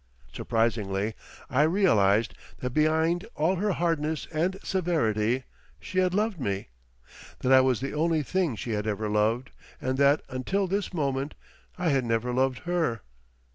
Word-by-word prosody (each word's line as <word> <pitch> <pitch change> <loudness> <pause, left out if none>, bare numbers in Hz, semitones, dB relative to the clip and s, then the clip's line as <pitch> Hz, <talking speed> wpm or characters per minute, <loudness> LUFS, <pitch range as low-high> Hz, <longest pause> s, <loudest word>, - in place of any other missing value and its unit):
Surprisingly 110 -2 0 0.3
I 135 - +2
realised 115 - +3 0.2
that 125 - -4
behind 160 - +2
all 165 +5 +1
her 205 +2 +1
hardness 160 -3 -1
and 175 +5 0
severity 130 - 0 0.4
she 185 - -2
had 185 0 +2
loved 210 -3 0
me, 100 - -2 0.7
that 130 - +1
I 130 0 +8
was 130 -2 +1
the 135 - -3
only 160 0 +1
thing 165 0 0
she 115 - -5
had 105 0 -2
ever 105 0 -1
loved 110 +4 +1 0.3
and 130 +1 -2
that 140 +1 +4
until 185 +11 -1
this 195 +2 -2
moment 140 -4 -2 0.4
I 180 -2 0
had 135 -3 +2
never 115 +1 -1
loved 130 0 +1
her. 165 - 0
140 Hz, 150 wpm, -27 LUFS, 115-170 Hz, 0.7 s, I